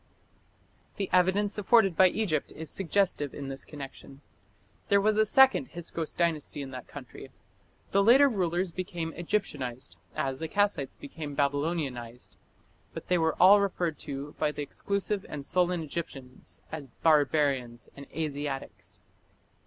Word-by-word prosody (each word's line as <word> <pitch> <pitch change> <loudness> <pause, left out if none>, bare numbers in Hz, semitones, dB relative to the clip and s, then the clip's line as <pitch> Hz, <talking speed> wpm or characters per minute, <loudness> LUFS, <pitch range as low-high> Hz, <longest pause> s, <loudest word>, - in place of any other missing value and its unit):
The 195 - -3
evidence 190 +3 +2
afforded 205 -3 +4
by 185 - +7
Egypt 180 -6 -1
is 160 -2 -8
suggestive 190 -6 0
in 140 -1 -6
this 135 0 -6
connection. 140 -1 -10 0.7
There 200 - +5
was 210 +1 +2
a 215 0 +3
second 265 +3 +5
Hyksos 170 -2 -4
Dynasty 160 -4 -1
in 135 - -8
that 125 -2 -8
country. - - -10 0.6
The 200 - +4
later 255 +7 +7
rulers 180 -5 0
became 170 -2 -4
"Egyptianized" 150 - -3 0.2
as 135 -1 -2
the 160 - -3
Kassites 200 -6 0
became 160 - -7
"Babylonianized", 140 -5 -2 0.6
but - - -8
they 180 -1 +3
were 160 0 +1
all 200 +2 +8
referred 175 -5 -1
to 140 0 -6
by 150 -1 +1
the 150 - -5
exclusive 200 +5 -2
and 145 -2 -6
sullen 180 -1 +1
Egyptians 140 -5 -7
as 150 -3 -6 0.2
"barbarians" 145 -6 +2
and 140 0 -10
"Asiatics". 145 -3 -5
160 Hz, 135 wpm, -29 LUFS, 140-195 Hz, 0.7 s, all